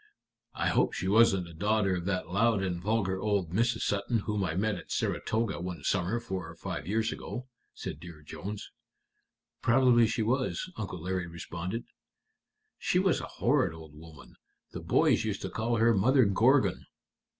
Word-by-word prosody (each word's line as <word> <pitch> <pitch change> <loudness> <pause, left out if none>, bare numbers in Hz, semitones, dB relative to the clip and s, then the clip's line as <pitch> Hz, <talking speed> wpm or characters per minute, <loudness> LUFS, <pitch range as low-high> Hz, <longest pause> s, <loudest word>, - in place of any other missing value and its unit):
"I - - 0
hope - - +2
she 95 - -3
wasn't 100 -3 +4
a 85 - -11
daughter 105 +2 +1
of 90 -1 -4
that 90 -3 -1
loud 100 +3 +2
and 90 -2 -2
vulgar 95 -2 0
old 100 -5 0
Mrs. 115 +4 +1
Sutton 105 +3 0
whom 105 -1 -1
I 80 -3 -2
met 110 +3 +1
at 90 - -8
Saratoga 110 -5 -1
one 90 -4 -5
summer 100 +4 0
four 95 -6 -5
or 85 - -11
five 80 - -5
years 110 +2 0
ago?" 125 0 -6 0.3
said - - -6
Dear 85 -3 -11
Jones. 100 +7 -7 0.9
"Probably 120 -1 +5
she 110 - -1
was," 130 +9 -1
Uncle 90 -6 -5
Larry 90 -1 -2
responded. 85 +5 -5 1.0
"She - - +1
was - - +2
a - - -6
horrid 80 - +2
old 80 -2 -12
woman. 80 +1 -14 0.3
The - - -6
boys - - +3
used - - -3
to - - -4
call 115 +1 -1
her 115 +1 +4
Mother 125 +6 +4
Gorgon." 105 0 +3
100 Hz, 170 wpm, -30 LUFS, 90-115 Hz, 1.0 s, Probably